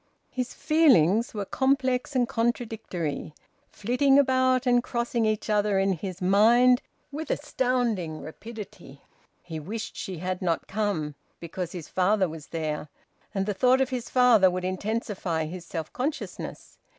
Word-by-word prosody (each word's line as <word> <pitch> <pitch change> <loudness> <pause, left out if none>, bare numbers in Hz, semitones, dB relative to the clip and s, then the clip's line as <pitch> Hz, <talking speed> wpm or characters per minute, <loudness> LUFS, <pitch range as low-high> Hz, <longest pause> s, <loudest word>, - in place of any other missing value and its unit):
His 250 -1 -4
feelings 235 - +4
were 205 -1 -2
complex 265 +2 0
and 245 -2 +3
contradictory, 225 - -2 0.3
flitting 270 +6 +2
about 260 -2 +3
and 245 -1 +3
crossing 235 -2 -1
each 215 -1 -1
other 210 -2 +2
in 195 0 +2
his 185 +1 -6
mind 235 +6 +5 0.3
with 305 +2 -5
astounding 230 -11 -1
rapidity. 200 - -10 0.4
He 160 -3 -6
wished 210 +8 -6
she 185 -2 -5
had 185 +2 -3
not 170 -3 0
come, 195 -8 -1 0.3
because 170 +1 -5
his 170 -5 -7
father 190 +1 +2
was 160 -2 -9
there, 155 -2 -3 0.5
and 195 0 0
the 205 - -1
thought 250 +6 +4
of 265 -1 +1
his 250 -3 -4
father 240 -7 +5
would 180 0 -3
intensify 185 -4 -2
his 170 +2 -7
self 160 -3 -5
consciousness. 285 +5 -5
210 Hz, 140 wpm, -26 LUFS, 180-250 Hz, 0.5 s, mind